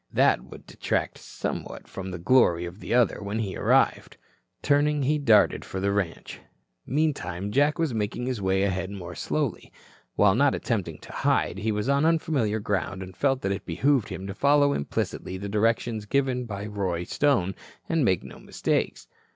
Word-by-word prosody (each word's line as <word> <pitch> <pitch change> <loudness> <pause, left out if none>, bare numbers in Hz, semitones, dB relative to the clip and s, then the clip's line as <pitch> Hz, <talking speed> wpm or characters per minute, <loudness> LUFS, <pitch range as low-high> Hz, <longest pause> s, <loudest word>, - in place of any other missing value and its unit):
That - - +3
would - - -13
detract - - -2
somewhat - - -6
from 95 -1 -6
the 90 - -5
glory 90 -3 +3
of 90 +3 -9
the - - -7
other 120 -2 +3
when 100 +2 -3
he 105 -4 -2
arrived. - - +2 0.5
Turning 145 0 +2
he 150 +3 +1
darted 110 -7 +4
for 95 - -5
the 100 +1 +1
ranch. 100 -4 -3 0.5
Meantime, 105 - -1
Jack 145 +5 +3
was 160 -6 0
making 110 +2 -2
his 125 -5 -2
way 95 0 +1
ahead 95 -1 -1
more 90 -3 -7
slowly. 125 - -3 0.4
While 105 -2 +5
not 140 +5 +3
attempting 90 -9 -2
to - - -11
hide, - - 0
he 110 - 0
was 105 +2 -2
on 140 +1 +2
unfamiliar 155 -10 +1
ground 100 -2 -2
and 95 0 -11
felt 135 +5 +1
that 95 - -1
it 100 - -3
behooved 125 - +1
him 95 -1 -6
to 100 - -5
follow 145 +4 +3
implicitly 90 +5 -3
the 100 +2 -5
directions 110 0 0
given 130 -1 0
by 100 -2 -5
Roy 95 -5 -2
Stone 95 -5 +1 0.3
and 165 -3 +1
make 95 -7 +2
no - - -11
mistakes. - - -2
105 Hz, 175 wpm, -26 LUFS, 95-135 Hz, 0.5 s, While